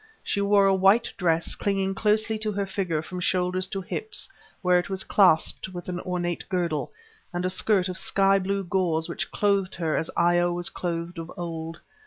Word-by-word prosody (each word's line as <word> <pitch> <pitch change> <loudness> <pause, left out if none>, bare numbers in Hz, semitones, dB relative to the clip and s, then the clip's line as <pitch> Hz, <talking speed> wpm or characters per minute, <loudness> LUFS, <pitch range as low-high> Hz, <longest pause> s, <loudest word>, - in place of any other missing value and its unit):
She 200 - -1
wore 200 0 +4
a 195 - +4
white 195 +5 +3
dress, 165 -2 0
clinging 195 -1 -1
closely 215 +2 +1
to 215 0 -1
her 200 0 -1
figure 185 -5 -2
from 180 +2 -6
shoulders 180 +1 0
to 195 +1 -4
hips, 435 - -3 0.4
where 180 -1 +4
it 175 - -5
was 190 -1 -1
clasped 185 -1 +3
by 175 -1 -6
an 180 -1 -4
ornate 175 -2 -3
girdle, 170 -5 -1 0.4
and 175 0 -2
a 185 - +2
skirt 190 0 +3
of 185 0 0
sky 195 0 +3
blue 195 +1 -1
gauze 175 -3 0
which 170 - -3
clothed 200 -2 0
her 165 -3 -1
as 160 - -1
Io 175 0 +3
was 175 0 -1
clothed 170 0 -4
of 165 +1 -7
old. 165 -1 -5
185 Hz, 190 wpm, -26 LUFS, 175-195 Hz, 0.4 s, wore